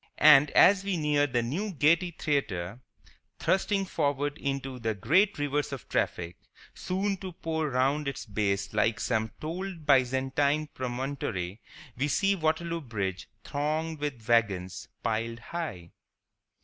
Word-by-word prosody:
And, 150 -1 +7
as 195 +1 +7
we 195 -2 -1
near 150 -2 +2
the 120 -3 0
new 185 - -3
Gaiety 170 +5 +3
Theatre, 120 - -2 0.6
thrusting 195 +1 +1
forward 145 -4 -1
into 135 -2 -3
the 110 -2 -1
great 190 - +3
rivers 145 0 -1
of 135 -3 -7
traffic 85 0 -1 0.4
soon 195 +2 -2
to 185 -1 -7
pour 160 -2 -2
round 135 +3 +1
its 140 - -4
base 100 -2 -1
like 110 +1 +2
some 110 -2 0
bold 170 +1 -5
Byzantine 140 +2 +2
promontory, 120 -7 -3 0.3
we 140 +4 0
see 195 +6 +2
Waterloo 165 0 -1
Bridge 100 - -4
thronged 155 +2 -2
with 135 -7 -4
wagons, 100 -6 +1 0.2
piled 115 +1 -1
high. 115 - -6
140 Hz, 130 wpm, -28 LUFS, 115-160 Hz, 0.6 s, And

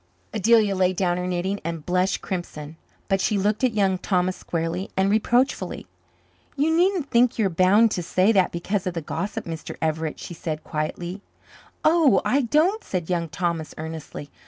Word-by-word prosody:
Adelia 215 -1 +3
laid 185 0 +2
down 175 -1 +1
her 180 0 -2
knitting 180 +3 -1
and 165 -2 -5
blushed 180 +1 0
crimson. 160 -4 -5 0.3
But 195 -1 +1
she 210 - +1
looked 205 +4 0
at 245 -4 +2
Young 190 -3 +2
Thomas 185 -1 0
squarely 170 +3 -3
and 190 +1 +3
reproachfully. 230 -2 +1 0.7
"You 315 +3 +2
needn't 355 -3 +1
think 240 0 +3
you 220 - +2
are - - +2
bound 195 +6 +4
to 180 - -1
say 185 +5 +2
that 190 -4 +3
because 185 +3 -2
of 180 - -3
the 165 - -2
gossip, 200 +6 -4
Mr. 165 -1 -6
Everett," 160 0 -2
she - - -7
said 155 -2 -5
quietly. 170 +4 -4 0.6
"Oh, 315 -3 +5
I 280 +3 +3
don't," 315 - +2
said 180 -2 -3
Young 170 -2 -1
Thomas 170 -2 -3
earnestly. 155 -2 -7
185 Hz, 175 wpm, -24 LUFS, 170-215 Hz, 0.7 s, Oh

